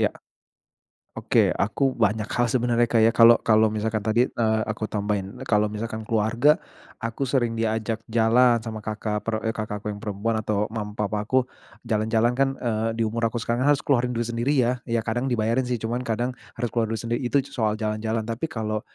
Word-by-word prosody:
Iya. - - +2 1.1
Oke, - - +3
aku 110 +7 -1 0.2
banyak 105 +1 0
hal 120 -1 +1
sebenarnya, 120 -1 +2
Kak, 115 -1 +3
ya. 115 - +5
Kalau 115 0 +8
kalau 110 0 +4
misalkan 110 +1 -1
tadi, 110 +2 +2
eee, 110 -1 +1
aku 110 0 -3
tambahin 100 -2 -3
kalau 105 -1 +2
misalkan, 110 +1 -5
keluarga, 115 +7 +3 0.5
aku 115 +4 -2
sering 120 -3 +1
diajak 110 0 -1
jalan 115 +1 +4
sama 110 -2 -5
kakak 105 0 -3
per 110 -1 -2
eee, 110 - 0
kakakku 105 -1 -4
yang 105 - -7
perempuan, 110 +2 -2
atau, 105 -1 -1
mama, 105 -2 -5
papaku, 105 +5 0 0.4
jalan-jalan 110 +2 +1
kan, 135 0 +4
eee, 115 -2 -1
di 115 - 0
umur 115 +1 0
aku 115 - -8
sekarang, 120 +4 0
harus 145 -2 +3
keluarin 125 -3 +1
duit 115 0 -1
sendiri 120 +5 0
ya 125 +1 0
ya 115 -1 0
kadang 120 +5 -1
dibayarin 115 +1 +1
sih, 125 - 0
cuman, 120 +3 -2
kadang 120 +3 -1 0.2
harus 120 -2 -2
keluar 115 -1 0
duit 110 0 -3
sendiri, 120 +1 -1
itu, 140 +1 +2
soal 110 -3 0
jalan-jalan. 110 +1 -2
Tapi, 115 +8 -3
kalau 110 -6 -3
115 Hz, 185 wpm, -24 LUFS, 110-120 Hz, 1.1 s, Kalau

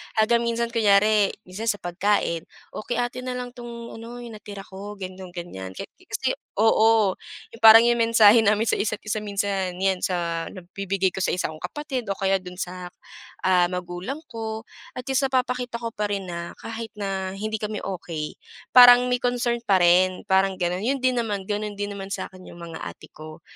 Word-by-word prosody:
hanggang 225 +2 +3
minsan 235 0 -1
kunyari, 210 -2 +4
minsan 200 +4 -7
sa 220 - +2
pagkain, 175 -2 0 0.2
o - - -6
kay 240 - -1
ate 245 +1 -3
na 255 0 -4
lang 250 0 -5
'tong 235 -1 -9
ano 240 +2 -9
'yung 235 - -8
natira 200 -2 -9
ko 200 +2 -9
ganoon, 185 -2 -8
ganiyan, 95 - -7
kasi - - -4 0.2
oo 220 -1 +4 0.4
'yung 230 - -13
parang 225 +1 +10
'yong 240 0 +3
mensahe 230 -1 +6
namin 215 0 +3
sa - - +2
isa't 205 0 -1
isa 215 0 -2
minsan 200 -2 -2
'yan 190 -1 +2
sa 170 -2 -2
nabibigay 190 +1 -2
ko - - -12
sa - - 0
isa 180 - -1
kong 155 - -9
kapatid 280 -5 -4
o 200 - -1
kaya 195 0 +1
dun 180 -1 -10
sa, 180 0 -6 0.6
ah, 180 -1 +4
magulang 180 - -5
ko, 220 -1 -5 0.3
at 250 - -8
least 270 +1 +2
napapakita 250 -2 -1
ko 230 - -2
pa 210 -2 -3
rin 195 -3 -3
na 170 0 -5
kahit 225 -1 -6
na 195 -2 -3
hindi 215 +3 -3
kami 210 0 -4
okey 165 -5 -5 0.3
parang 245 0 +8
may 250 - +2
concern 245 -1 0
pa 190 -2 +4
rin, 180 +1 +4
parang 190 0 +3
ganun. 180 +4 -1
'Yun 270 +2 0
din 255 -1 +2
naman, 205 -4 -2
gano'n 210 0 -2
din 205 0 -5
naman 195 0 -5
sa'kin 185 -2 -7
'yung 170 - -12
mga 165 -1 -7
ate - - -10
ko. 155 +1 -11
205 Hz, 190 wpm, -24 LUFS, 185-230 Hz, 0.6 s, parang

